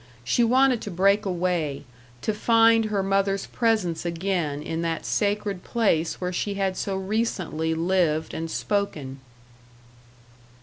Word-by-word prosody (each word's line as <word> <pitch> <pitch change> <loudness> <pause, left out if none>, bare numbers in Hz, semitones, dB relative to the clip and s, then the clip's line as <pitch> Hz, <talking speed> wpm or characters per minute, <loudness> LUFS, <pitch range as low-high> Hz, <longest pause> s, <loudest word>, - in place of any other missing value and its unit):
She 240 - +2
wanted 255 +1 +3
to - - -5
break 200 +3 +2
away, 175 -6 -1 0.4
to 215 - 0
find 225 +1 +4
her 205 -2 -1
mother's 195 0 +1
presence 215 -8 0
again 170 -4 -2
in 165 +1 -3
that 165 -1 -2
sacred 205 -2 -1
place 170 -9 0
where 180 0 -3
she 200 +3 -2
had 195 -1 -1
so 195 +1 -2
recently 190 -6 -1
lived 165 -2 +1
and 165 0 -4
spoken. 155 -10 -2
190 Hz, 130 wpm, -25 LUFS, 165-210 Hz, 0.4 s, find